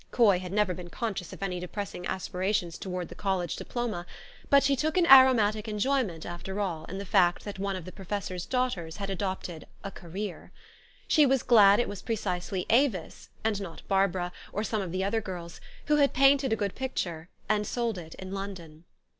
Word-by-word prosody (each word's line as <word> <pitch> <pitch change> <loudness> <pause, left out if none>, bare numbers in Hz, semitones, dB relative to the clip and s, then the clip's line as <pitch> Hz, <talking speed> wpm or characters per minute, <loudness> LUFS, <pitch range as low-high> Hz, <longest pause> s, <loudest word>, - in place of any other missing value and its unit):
Coy 205 -7 +4
had 180 -1 -7
never 205 -2 +2
been 175 0 -8
conscious 195 -4 -4
of - - -8
any 180 -2 -2
depressing 180 0 -5
aspirations 185 -1 -2
towards 180 -2 -4
the - - -8
college 190 -4 -1
diploma; 220 -8 -4 0.4
but 280 0 +6
she 275 0 +3
took 310 +5 -1
an 355 - +5
aromatic 235 -7 +7
en 210 -1 -3
jo}Tnent, 215 - 0
after 185 +3 -5
all, 170 -6 -2
in 190 - -6
the 200 - -5
fact 180 -2 +3
that 205 -2 -6
one 195 0 -1
of 185 -3 -6
the 185 - -8
pro 195 - -11
fessor's 185 -2 -4
daughters 245 -11 -1
had 200 -1 -4
adopted 185 -4 -4
" - - -29
a 195 - -5
career." 190 +3 -7 0.6
She 300 -3 +5
was 265 -1 +2
glad 205 -4 +7
it 240 - +1
was 205 - -6
precisely 185 -5 -2
Avis, 230 - +1
and 215 -2 0
not 170 -4 -8
Barbara, 190 -2 +1 0.2
or 210 - -2
some 220 -1 -1
of 185 -3 -4
the 185 +2 -1
other 220 +3 0
girls, 175 -5 -7 0.2
who 300 0 +3
had 285 -1 +3
painted 275 -1 +5
a - - +4
good 205 -3 -2
picture, 175 -11 -4 0.2
and 210 -1 +1
sold 235 -5 -1
it 160 -2 -10
in 190 0 -8
London. 180 -5 -7
195 Hz, 200 wpm, -28 LUFS, 180-225 Hz, 0.6 s, aromatic